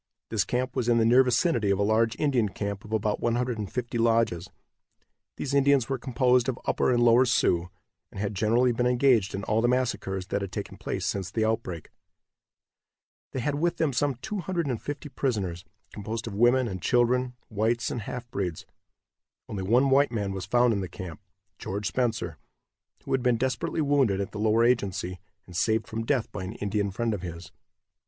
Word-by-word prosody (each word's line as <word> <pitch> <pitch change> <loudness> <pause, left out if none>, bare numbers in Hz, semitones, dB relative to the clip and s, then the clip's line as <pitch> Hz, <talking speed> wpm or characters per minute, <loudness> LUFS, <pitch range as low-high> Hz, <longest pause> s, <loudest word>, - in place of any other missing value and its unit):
This 105 -5 +1
camp 125 +3 -2
was 125 -2 0
in 120 - +4
the 115 - +3
near 120 +3 +6
vicinity 125 - +1
of 100 - +2
a 100 - +1
large 110 +2 +2
Indian 130 -8 +1
camp 100 0 -4
of 105 - -12
about 110 -1 0
150 120 0 -2
lodges. 115 -6 +1 0.9
These 140 - -3
Indians 140 -3 +3
were 135 -2 -1
composed 125 0 +2
of 130 - -2
Upper - - +1
and 120 -1 +3
Lower 120 +2 +6
Sioux, 90 -8 +2 0.4
and - - -9
had 105 +1 -2
generally 115 +5 +2
been 125 +1 +1
engaged 125 -6 +3
in 100 - -4
all 110 +3 +1
the 120 - +3
massacres 120 -7 -1
that 100 - -1
had 100 -2 -4
taken - - -5
place - - -3
since 95 -3 -2
the 110 -1 0
outbreak. 110 -8 -3 1.4
They 130 - -3
had 145 +3 -1
with 170 +1 0
them 155 -4 +1
some 140 +2 +1
250 150 - -3
prisoners, 100 -11 -2 0.3
composed 110 +2 -5
of 115 - -6
women 120 +4 +3
and 95 -4 -5
children, 125 +2 +2
whites 110 +3 0
and 120 - -3
half 120 +3 -6
breeds. 90 -7 -3 0.8
Only 100 - -4
one 125 +8 +3
white 140 -1 +4
man 105 -4 -2
was 95 -2 -5
found 120 +1 +3
in 100 - -1
the 95 - -5
camp, 95 -2 -8 0.4
George 100 +2 -4
Spencer, 115 - -1 0.6
who - - -7
had 130 - +2
been 125 -2 +2
desperately 130 +7 -1
wounded 140 -9 +2
at 100 +1 -3
the 105 - -6
Lower 110 +2 +3
Agency, 100 -6 0 0.3
and 90 - -13
saved 110 +4 +1
from 115 +2 -4
death 135 -6 0
by 100 - -5
an 95 +3 -5
Indian 100 -1 -1
friend 115 +4 -1
of 100 - -4
his. 85 -1 -8
115 Hz, 185 wpm, -27 LUFS, 100-125 Hz, 1.4 s, near